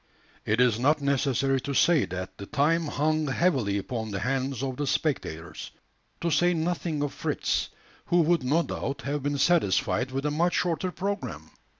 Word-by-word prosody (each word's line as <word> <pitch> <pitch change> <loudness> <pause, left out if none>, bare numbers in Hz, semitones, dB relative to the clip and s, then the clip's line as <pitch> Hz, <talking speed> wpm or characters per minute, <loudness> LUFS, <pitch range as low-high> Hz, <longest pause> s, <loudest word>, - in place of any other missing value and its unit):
It 110 +2 +2
is 120 -3 +4
not 150 +5 +3
necessary 135 -1 +1
to 140 +1 -4
say 165 - +4
that 95 0 -6
the 100 - -7
time 160 +3 +1
hung 155 +1 0
heavily 135 - +1
upon 110 +2 -4
the 100 -2 -3
hands 135 +2 -1
of 130 -2 -3
the 145 - -2
spectators 85 - -2 0.5
to 170 - 0
say 175 +4 +3
nothing 165 -2 -1
of 145 - -3
Fritz, - - -1 0.4
who 175 0 +4
would 170 +1 +3
no 145 +7 +2
doubt 140 -2 -4
have 145 +1 -2
been 145 +1 -1
satisfied 135 - +2
with 135 +2 -3
a 150 - +1
much 170 +4 +1
shorter 180 +1 0
programme. 175 - -4
140 Hz, 175 wpm, -27 LUFS, 125-165 Hz, 0.5 s, is